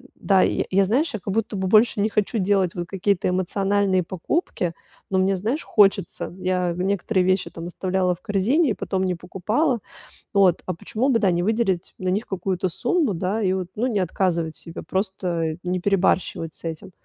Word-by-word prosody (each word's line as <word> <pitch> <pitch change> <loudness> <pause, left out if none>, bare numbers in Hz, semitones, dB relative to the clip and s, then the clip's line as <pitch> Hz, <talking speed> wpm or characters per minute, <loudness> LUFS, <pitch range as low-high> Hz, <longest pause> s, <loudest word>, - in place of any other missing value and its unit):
да, 195 -2 +3
я - - +1
я, 195 +1 +4
знаешь, 245 - +1
я 220 - -3
как 195 - -3
будто 220 0 -1
бы 190 -1 -1
больше 215 0 +4
не 215 - +2
хочу 210 +2 0
делать 190 -2 +1
вот 175 -1 -3
какие-то 195 -1 0
эмоциональные 190 +1 +1
покупки, 180 - -2 0.4
но 190 - +1
мне, 190 +1 +2
знаешь, 230 - -2
хочется. 195 -5 +2
Я 180 -2 0
некоторые 190 +1 0
вещи 185 0 +1
там 165 0 -7
оставляла 185 0 0
в 175 - -26
корзине 230 - +2
и - - +1
потом 190 -1 -2
не 185 -1 0
покупала. 210 - 0 0.5
Вот, 195 -4 +4
а 185 - -2
почему 225 +9 -1
бы, 235 -4 +3
да, 200 -3 +3
не 175 0 0
выделить 195 -4 0
на 185 - -4
них 205 +5 0
какую-то 185 -1 -1
сумму, 295 - 0
да, 190 +5 -1
и 190 -3 +2
вот, 185 -2 -2
ну, 240 +4 0
не 210 -5 0
отказывать 170 -3 0
себе? 165 - -8
Просто 180 -5 -2
не 180 0 -1
перебарщивать 180 -4 +1
с - - -16
этим? 165 +2 -6
190 Hz, 190 wpm, -23 LUFS, 180-210 Hz, 0.5 s, я